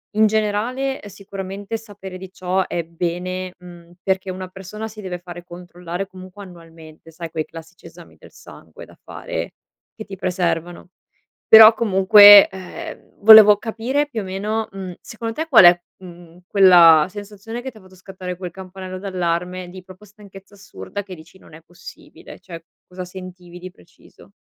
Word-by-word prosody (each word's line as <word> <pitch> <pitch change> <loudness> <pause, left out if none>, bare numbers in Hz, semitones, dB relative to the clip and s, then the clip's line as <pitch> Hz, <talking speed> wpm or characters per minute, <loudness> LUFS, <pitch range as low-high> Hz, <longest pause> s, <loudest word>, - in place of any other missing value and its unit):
in 215 0 +4
generale 220 +6 -2
sicuramente 200 +1 -8
sapere 200 -4 -11
di 185 0 -11
ciò 185 0 -2
è 170 - -4
bene, 180 +2 -5
mhmm, 175 -1 -16
perché 190 -1 -2
una 185 0 -7
persona 195 +4 -9
si 215 -1 -12
deve 180 -2 -6
fare 175 -1 -11
controllare 175 +1 -8
comunque 185 +2 -13
annualmente, 165 -3 -16
sai 165 0 -9
quei 155 -1 -4
classici 165 +1 -14
esami - - -16
del - - -18
sangue - - -15
da - - -20
fare - - -7 0.4
che 215 - -10
ti 195 - -9
preservano, 175 -2 -3 0.6
però 220 0 +9
comunque, 205 -1 +7
ehm, 190 -2 -11
volevo 215 -1 +9
capire 245 +7 -3
più 225 -7 -5
o - - -9
meno, 210 +4 -4
mhmm, 190 -2 -8
secondo 225 0 -7
te 320 +1 -4
qual'è, 175 - +6 0.2
mhmm, 175 -2 -15
quella 175 -5 +6
sensazione 210 +4 -9
che 265 - -6
ti 225 - -24
ha - - -15
fatto 185 0 -19
scattare 185 -1 -9
quel 180 -1 -7
campanello 185 0 -10
d'allarme, 180 -1 -4
di 185 0 -12
proprio 185 +2 -16
stanchezza 200 -1 -17
assurda, 205 +1 -9
che 190 -2 -10
dici: 170 +3 -17
"Non 155 - -19
è 160 - -13
possibile", 175 +1 -15
cioè 165 -3 -12 0.2
cosa 180 0 -8
sentivi 180 -1 -12
di 185 0 -9
preciso? 90 - -22
185 Hz, 160 wpm, -19 LUFS, 175-205 Hz, 0.6 s, però